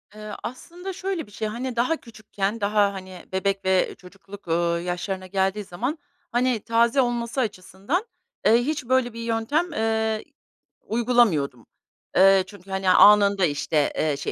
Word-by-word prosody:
Eee, 215 0 -8
aslında 350 +9 -7
şöyle 375 - -4
bir - - -18
şey, 215 +2 -3
hani, 240 +3 -4
daha 255 +7 +1
küçükken 215 -1 -5
daha, 205 0 +2
hani, 185 -2 -9
bebek 195 0 -1
ve 190 -1 +2
çocukluk, 195 +1 -14
ııı, 170 +1 +1
yaşlarına 185 +2 -4
geldiği 195 +2 0
zaman, 240 - -3 0.3
hani, 245 -1 +1
taze 235 +3 +3
olması 240 +1 -1
açısından, 210 - -3 0.4
eee, - - +6
hiç 270 +2 -2
böyle 255 -1 +1
bir 230 - -8
yöntem, 230 +9 -1
eee, 220 0 0 0.6
uygulamıyordum. 215 - +1 0.5
Eee, 195 0 +6
çünkü, 195 -2 -14
hani, 190 -1 0
anında, 200 -1 +6
işte, 150 0 0
eee, 150 -2 0
şey 140 - -4
210 Hz, 145 wpm, -24 LUFS, 190-240 Hz, 0.6 s, eee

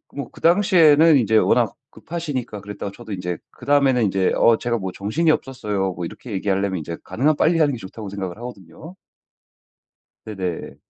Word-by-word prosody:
뭐 140 -4 -5
그 - - -16
당시에는 165 -4 +5
이제 110 -2 +3
워낙 - - +3 0.2
급하시니까 135 -11 -5
그랬다가 100 -1 -6
저도 110 -4 -8
인제 90 -2 -4
그다음에는 140 -4 +2
인제 95 -1 +1
"어 115 -1 +4
제가 120 -1 -1
뭐 95 -1 -4
정신이 130 - -1
없었어요." 105 -10 -2
뭐 90 -1 -5
이렇게 115 +7 -9
얘기하려면 95 -1 -1
이제 85 +2 -6
가능한 145 +6 +1
빨리 165 +3 +2
하는 145 -3 +3
게 - - -4
좋다고 100 +2 -8
생각을 95 -1 -5
하거든요. 120 - -10 1.3
네네. 95 -5 -5
110 Hz, 395 characters per minute, -21 LUFS, 95-145 Hz, 1.3 s, 당시에는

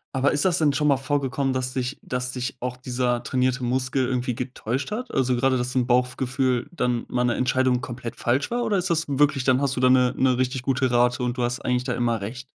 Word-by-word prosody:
Aber 135 +2 +2
ist 145 +3 0
das 180 -3 +2
denn 155 -3 +3
schon 150 +1 0
mal 140 - +5
vorgekommen, 135 0 -1
dass 130 -1 -2
dich 130 +1 -3
dass 125 0 -3
dich 125 +1 -4
auch 125 0 -3
dieser 125 -1 -1
trainierte 125 0 0
Muskel 130 +1 0
irgendwie 125 -1 -1
getäuscht 125 - -4
hat? 245 +4 -4
Also 130 -1 +2
gerade, 130 +1 +2
dass 125 +1 -3
'n 125 -2 +1
Bauchgefühl 125 0 0
dann 125 -8 -1
mal 125 0 0
'ne 120 - +1
Entscheidung 130 -1 +1
komplett 120 -1 -6
falsch 130 +4 0
war 240 0 -1
oder 215 -4 +1
ist 185 0 -1
das 165 -2 +1
wirklich 140 -1 +2
dann 130 0 +3
hast 140 -1 0
du 125 - -2
da 130 - +5
'ne 125 -1 +4
'ne 130 -1 +3
richtig 130 0 -1
gute 130 0 +1
Rate 125 0 +2
und 125 -1 -1
du 125 - 0
hast 120 +1 -1
eigentlich 125 0 0
da 125 -1 -2
immer 115 -3 0
recht? 125 +6 -6
130 Hz, 240 wpm, -24 LUFS, 125-135 Hz, -, mal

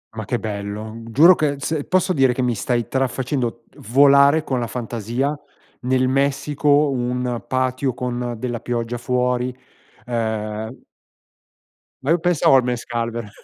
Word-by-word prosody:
Ma 110 - -5
che 120 +4 -1
bello. 105 +1 -5
Giuro 160 +10 +7
che 150 -4 0
se 145 +1 -3
posso 185 0 +1
dire 135 -3 +3
che 130 +1 -2
mi 120 -1 +1
stai 120 +2 -1
tra 135 0 +1
facendo 125 -3 -3
d - - -25
volare 140 +3 +5
con 130 -2 -2
la 120 - -2
fantasia 120 +4 -3 0.5
nel 130 0 +1
Messico, 145 +2 +2
un 125 -1 -2
patio 130 0 -1
con 120 -1 -3
della 120 -1 -3
pioggia 120 0 -3
fuori, 125 0 -1 0.5
ehm 110 -1 -3 1.2
Ma 140 - -3
io 170 - +3
pensavo 170 -5 +3
al 130 - +5
mezcal 120 -1 -2
vera 115 -3 -6
125 Hz, 145 wpm, -21 LUFS, 120-140 Hz, 1.2 s, Giuro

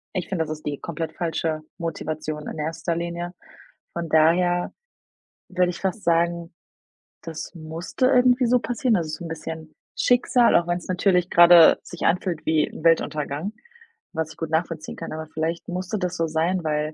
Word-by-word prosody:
ich 185 - -3
finde, 175 -4 0
das 155 - -6
ist 155 -1 -7
die 145 -1 -3
komplett 165 -1 -4
falsche 160 -2 -2 0.2
Motivation 155 -2 -4
in 155 - -6
erster 165 +2 -2
Linie. 170 +1 -4 0.6
Von 170 -2 -4
daher 175 +3 +3 0.8
würde 180 -1 +1
ich 175 - -8
fast 195 +2 -2
sagen, 170 0 +1 0.7
das 160 -2 -7
musste 165 +9 -2
irgendwie 250 -1 +4
so 245 +1 +3
passieren. 235 -1 0
Also, 155 0 -4
so'n 165 - -6
bisschen 160 0 -7 0.2
Schicksal, 245 -1 +3
auch 170 0 +3
wenn's 175 0 -2
natürlich 180 -1 +2
grade 170 -1 +8
sich 175 - -11
anfühlt 175 -1 0
wie 155 -1 +2
'n - - -10
Weltuntergang, 160 +2 +1 0.6
was 160 -1 -3
ich - - -15
gut 165 -1 -4
nachvollziehen 160 -1 -2
kann. - - -6
Aber 160 0 -6
vielleicht 160 +2 -3
musste 185 +4 -3
das 180 -2 -3
so 165 - 0
sein, 165 +4 0
weil, 150 0 -1
170 Hz, 165 wpm, -24 LUFS, 160-180 Hz, 0.8 s, grade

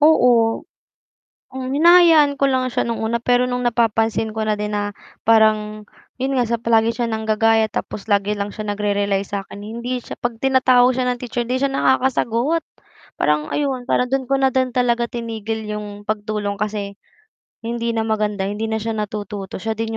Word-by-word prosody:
oo, 245 -7 +4 0.9
um, 260 -1 -5
hinahayaan 320 0 +6
ko 275 0 +1
lang 260 -1 +1
siya - - +1
nung 230 -1 -2
una 235 +1 -1
pero 245 +1 +2
nung 250 0 -2
napapansin 225 -2 +1
ko 220 - -3
na 215 -1 0
din 210 0 -3
na 205 0 -1 0.3
parang 215 -1 +2 0.3
'yon 265 +2 -1
nga 240 -3 +1
palagi 225 -1 +2
siya 235 +1 -1
nanggagaya 220 0 +1
tapos 215 0 -5
lagi 205 0 +2
lang 205 0 -3
siya 210 0 -4
nag-re-realize 200 -1 -1
sa 200 -1 -4
akin, 200 - -10
hindi 235 +4 -4
siya - - -9
'pag 235 -2 -4
tinatawag 255 -1 +4
siya 255 - 0
ng 245 - -10
teacher 240 -1 -3
hindi 255 +2 -2
siya 275 - +2
nakakasagot, 265 +3 +1 0.6
parang 150 +1 +1
ayun, 270 -4 -1
para 250 -1 +1
do'n 270 0 0
ko 275 - -2
na 265 - +4
din 260 -1 0
talaga 240 -1 +1
tinigil 225 -2 -4
'yong 210 -1 -6
pagtulong 210 -1 -2
kasi 205 -1 -4 0.7
hindi 235 0 -2
na 225 - 0
maganda, 210 -3 -1
hindi 205 +3 -3
na 220 - -1
siya 225 +1 -3
natututo 210 -2 -5
siya 220 +4 -3
din 225 0 -3
225 Hz, 175 wpm, -20 LUFS, 210-250 Hz, 0.9 s, hinahayaan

